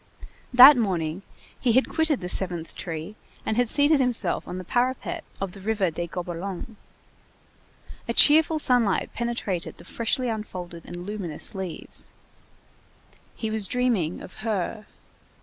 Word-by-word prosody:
That 260 +3 +10
morning 180 -6 -1 0.4
he 240 -3 +2
had 260 +3 +3
quitted 320 -5 +1
the 180 - -4
seventh 175 -3 -1
tree 165 +3 -6 0.3
and 220 - -1
had 245 0 +1
seated 290 +2 +4
himself 250 -3 0
on 180 - -5
the 185 - -6
parapet 260 - -1 0.2
of 195 -2 -3
the 195 - -12
River 200 -3 0
des 170 +2 -4
Gobelins. 180 +5 -6 1.3
A - - +1
cheerful 315 +1 +6
sunlight 245 -9 +2
penetrated 235 -7 -3
the - - -13
freshly 245 +3 0
unfolded 180 -7 -6
and 175 0 -8
luminous 195 -7 -4
leaves. 190 -4 -4 1.2
He 220 -1 -4
was 215 -3 +1
dreaming 230 -9 0
of 185 - -12
"Her." 215 -1 -3
210 Hz, 135 wpm, -25 LUFS, 180-245 Hz, 1.3 s, That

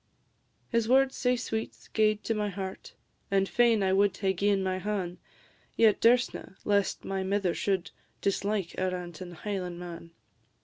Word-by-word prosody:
His 230 -1 +1
words, 265 +1 +4
sae 250 0 +2
sweet, 225 -2 -4
gaed 215 -1 +2
to 225 - 0
my 210 -1 -1
heart, 190 0 -6 0.3
And 195 0 +2
fain 230 -3 +3
I 190 0 +2
wad 200 +1 +3
hae 190 -1 +1
gi'en 200 +1 +1
my 185 0 -1
han'; 185 -3 -3 0.6
Yet 220 -2 +4
durstna, 235 -4 +2
lest 200 -1 +1
my 195 0 -2
mither 190 -2 0
should 190 -3 -1 0.3
Dislike 200 -2 -1
a 185 0 +1
rantin' 175 -1 -6
Highlandman. 175 -3 -5
200 Hz, 145 wpm, -29 LUFS, 185-215 Hz, 0.6 s, words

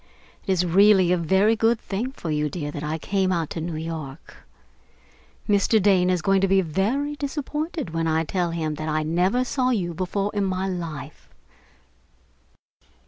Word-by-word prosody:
It - - +1
is 180 -1 +2
really 190 0 +5
a - - +4
very 190 +6 +3
good 225 +1 +2
thing 225 +7 -4
for 170 - -6
you, 150 0 0
dear, 145 -2 -5
that 145 - -6
I 155 +1 -2
came 190 +3 0
out 165 -4 -1
to 165 - -4
New 165 0 -4
York. 155 -2 -7 1.1
Mr. 210 +1 +3
Dane 190 -2 +3
is 180 -3 0
going 195 +1 +3
to 195 - +3
be 195 0 +4
very 220 - -1
disappointed 295 - -4
when 165 0 -1
I 160 0 +1
tell 175 +1 -1
him 160 -2 -2
that 155 - -3
I 155 0 0
never 180 +10 +1
saw 255 0 0
you 185 -8 -1
before 195 +4 -2
in 205 -1 0
my 190 0 -1
life.... 160 -5 -6
185 Hz, 175 wpm, -24 LUFS, 160-205 Hz, 1.1 s, really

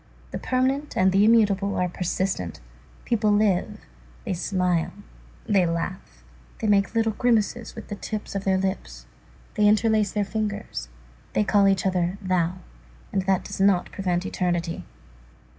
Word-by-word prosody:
The - - -4
permanent 265 +3 0
and 190 0 +4
the 195 +2 +4
immutable 205 -3 +3
are 180 - +1
persistent. 180 - -2 0.5
People 215 -3 +2
live, 205 0 +1 0.4
they 190 - -1
smile, 180 -2 0 0.5
they 195 -3 +3
laugh, 165 - -4 0.4
they - - -3
make 200 -1 +2
little 225 -1 +2
grimaces 235 0 0
with 225 - -8
the 205 - -3
tips 215 +1 -5
of 195 -1 -3
their 190 -1 +2
lips, 60 - -3 0.5
they 210 0 +3
interlace 215 -1 +3
their 210 -1 0
fingers, 205 - -4 0.4
they - - +2
call 200 0 +4
each 195 0 +2
other 180 0 0
thou, 185 -2 0 0.6
and 195 - +2
that 190 -2 +2
does 200 -1 -5
not 195 -2 +3
prevent 180 -2 -1
eternity. 175 - -2
195 Hz, 145 wpm, -25 LUFS, 180-210 Hz, 0.6 s, and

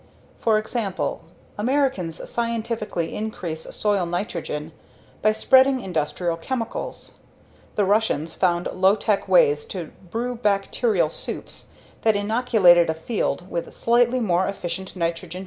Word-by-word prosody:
For 220 -2 +3
example, 215 -3 -2 0.4
Americans 240 - 0
scientifically 230 -6 -2
increase 175 -7 -5
soil 200 -4 +1
nitrogen 170 -4 -3 0.5
by 215 - +4
spreading 260 +4 +5
industrial 170 -1 -2
chemicals; 245 - -5 0.6
the 205 - +2
Russians 195 -6 +1
found 175 -1 +1
low 190 +2 +4
tech 210 -1 0
ways 455 -3 +4
to 485 - -6 0.2
brew 240 +5 -2
bacterial 230 - +1
soups - - -3 0.3
that 220 -2 +3
inoculated 205 -5 +4
a 160 - 0
field 180 0 -2
with 170 - -3
slightly 240 +2 +2
more 185 -5 +1
efficient 190 -1 -4
nitrogen 170 -2 +1 0.2
fixing 180 - -7
microorgamsms. - - -5
205 Hz, 125 wpm, -23 LUFS, 175-235 Hz, 0.6 s, spreading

